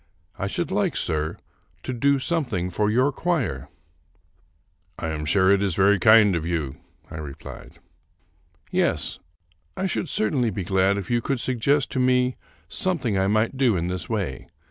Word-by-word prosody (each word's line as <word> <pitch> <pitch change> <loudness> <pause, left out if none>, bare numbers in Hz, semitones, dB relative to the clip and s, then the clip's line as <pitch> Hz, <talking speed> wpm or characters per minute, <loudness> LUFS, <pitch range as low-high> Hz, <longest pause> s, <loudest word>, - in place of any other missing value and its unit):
I 100 - -3
should 170 - -2
like, 195 -3 0
sir, 80 -1 -1 0.5
to 130 - -4
do 140 +4 +2
something 125 - -1
for 105 +4 +1
your 130 +6 +2
choir." 135 - -2 0.7
" - - -41
I 80 - -3
am 75 -1 -4
sure 95 +3 +3
it 100 0 +3
is 100 -4 0
very 100 +1 +4
kind 110 -2 +6
of 85 - -2
you," 80 -5 -3 0.3
I - - -6
replied. 75 -3 -9 0.5
" - - -37
Yes, - - -1 0.6
I 190 - -1
should 185 -3 -2
certainly 120 +2 +1
be 100 -2 -4
glad 95 +2 +2
if 100 +3 -5
you 120 0 +2
could 135 +1 -2
suggest 130 +3 +1
to 130 - -1
me 125 0 +2 0.3
something 170 - 0
I 95 0 +2
might 110 +5 +1
do 125 -7 +3
in 85 +1 -2
this 90 -2 -4
way. 100 - -3
105 Hz, 170 wpm, -24 LUFS, 90-130 Hz, 0.7 s, kind